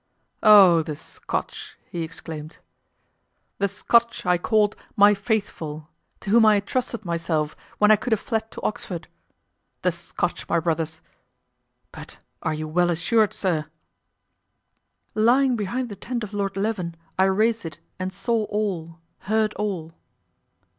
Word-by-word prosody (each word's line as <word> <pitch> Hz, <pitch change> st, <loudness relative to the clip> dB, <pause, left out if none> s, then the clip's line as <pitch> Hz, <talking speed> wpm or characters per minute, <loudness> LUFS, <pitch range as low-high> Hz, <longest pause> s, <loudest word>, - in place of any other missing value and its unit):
"Oh! 195 Hz, -6 st, +8 dB
the 155 Hz, -1 st, -5 dB
Scotch," -, -, -6 dB
he 170 Hz, -, -3 dB
exclaimed, 160 Hz, -1 st, -7 dB, 1.0 s
"the 200 Hz, -, +2 dB
Scotch 235 Hz, +4 st, +1 dB
I 180 Hz, -1 st, +3 dB
called 210 Hz, +1 st, +2 dB, 0.2 s
'my 205 Hz, +1 st, +7 dB
faithful,' 195 Hz, -8 st, -3 dB, 0.3 s
to 195 Hz, -, -4 dB
whom 230 Hz, +1 st, +6 dB
I 215 Hz, -2 st, +6 dB
trusted 235 Hz, +1 st, -3 dB
myself 165 Hz, -3 st, -1 dB, 0.2 s
when 210 Hz, 0 st, +5 dB
I 215 Hz, -, +7 dB
could 220 Hz, +4 st, -5 dB
have 220 Hz, -, +3 dB
fled 220 Hz, 0 st, -2 dB
to -, -, -9 dB
Oxford! 180 Hz, -5 st, -3 dB, 0.8 s
the -, -, +3 dB
Scotch, -, -, -4 dB
my 170 Hz, -, +3 dB
brothers! 160 Hz, -1 st, -2 dB, 0.9 s
But -, -, -11 dB, 0.2 s
are 160 Hz, -, -1 dB
you 155 Hz, 0 st, -4 dB
well 175 Hz, +3 st, +2 dB
assured, 205 Hz, +6 st, +2 dB
sir?" 160 Hz, -6 st, -1 dB, 1.5 s
"Lying 245 Hz, +4 st, +4 dB
behind 235 Hz, +4 st, -2 dB
the 205 Hz, -, -7 dB
tent 240 Hz, +2 st, -4 dB
of 210 Hz, -1 st, -7 dB
Lord 200 Hz, -1 st, -2 dB
Leven, 195 Hz, -5 st, -2 dB, 0.2 s
I 190 Hz, -, +6 dB
raised 220 Hz, +4 st, +2 dB
it 160 Hz, -3 st, -7 dB, 0.2 s
and 185 Hz, 0 st, -2 dB
saw 220 Hz, +3 st, -1 dB
all, 185 Hz, -7 st, -3 dB, 0.3 s
heard 215 Hz, +1 st, +1 dB
all!" 185 Hz, -6 st, -3 dB
200 Hz, 140 wpm, -24 LUFS, 165-220 Hz, 1.5 s, Oh